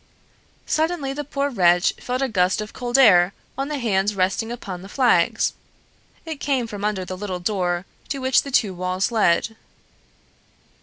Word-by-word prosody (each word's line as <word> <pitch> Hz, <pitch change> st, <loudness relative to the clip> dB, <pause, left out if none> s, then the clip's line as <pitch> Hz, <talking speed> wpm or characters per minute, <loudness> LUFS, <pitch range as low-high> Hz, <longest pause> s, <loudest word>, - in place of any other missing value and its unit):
Suddenly 315 Hz, -4 st, -1 dB
the 295 Hz, +1 st, -4 dB
poor 280 Hz, 0 st, -2 dB
wretch 175 Hz, -5 st, +3 dB
felt 250 Hz, +2 st, -2 dB
a -, -, +1 dB
gust 185 Hz, -5 st, +1 dB
of 215 Hz, 0 st, -6 dB
cold 245 Hz, +1 st, -1 dB
air 190 Hz, -8 st, +6 dB, 0.2 s
on 275 Hz, +1 st, -2 dB
the 300 Hz, 0 st, -3 dB
hands 205 Hz, -4 st, 0 dB
resting 195 Hz, +4 st, 0 dB
upon 195 Hz, -7 st, -6 dB
the 195 Hz, -, -11 dB
flags; 255 Hz, +2 st, +2 dB, 0.7 s
it 320 Hz, -3 st, -6 dB
came 270 Hz, -5 st, 0 dB
from 205 Hz, -3 st, -7 dB
under 205 Hz, -3 st, -1 dB
the 185 Hz, -, -5 dB
little 185 Hz, -1 st, -5 dB
door 180 Hz, -2 st, -1 dB, 0.2 s
to 275 Hz, -, -2 dB
which 260 Hz, -1 st, +3 dB
the 280 Hz, -, -8 dB
two 215 Hz, -7 st, +2 dB
walls 185 Hz, +4 st, -1 dB
led. 220 Hz, 0 st, +2 dB
215 Hz, 165 wpm, -22 LUFS, 185-265 Hz, 0.7 s, air